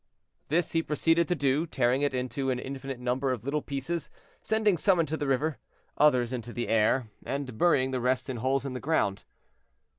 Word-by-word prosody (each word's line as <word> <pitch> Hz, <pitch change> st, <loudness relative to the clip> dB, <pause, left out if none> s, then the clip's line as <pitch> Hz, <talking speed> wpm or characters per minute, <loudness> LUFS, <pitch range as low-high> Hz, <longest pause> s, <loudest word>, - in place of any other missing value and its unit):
This 165 Hz, +2 st, +1 dB
he 165 Hz, -, +2 dB
proceeded 165 Hz, +2 st, +2 dB
to 180 Hz, -, +1 dB
do; 145 Hz, +2 st, +1 dB
tearing 130 Hz, -1 st, +1 dB
it 145 Hz, -, +2 dB
into 130 Hz, +2 st, -2 dB
an 130 Hz, -, 0 dB
infinite 135 Hz, 0 st, -6 dB
number 125 Hz, +2 st, 0 dB
of 125 Hz, -4 st, -3 dB
little 145 Hz, +3 st, -1 dB
pieces, 145 Hz, +4 st, -3 dB, 0.3 s
sending 215 Hz, -3 st, +2 dB
some 185 Hz, +1 st, +3 dB
into 160 Hz, -1 st, 0 dB
the 145 Hz, -2 st, -3 dB
river, 140 Hz, +3 st, 0 dB, 0.4 s
others 130 Hz, -5 st, +3 dB
into 120 Hz, -1 st, -5 dB
the 120 Hz, 0 st, -3 dB
air, 115 Hz, +1 st, +2 dB
and 135 Hz, -3 st, -4 dB
burying 130 Hz, -2 st, +3 dB
the 130 Hz, -1 st, -1 dB
rest 125 Hz, +1 st, +1 dB
in 130 Hz, -3 st, -4 dB
holes 135 Hz, +4 st, 0 dB
in 135 Hz, -, -4 dB
the 125 Hz, -, -4 dB
ground. 130 Hz, -11 st, 0 dB
135 Hz, 190 wpm, -28 LUFS, 125-155 Hz, 0.4 s, some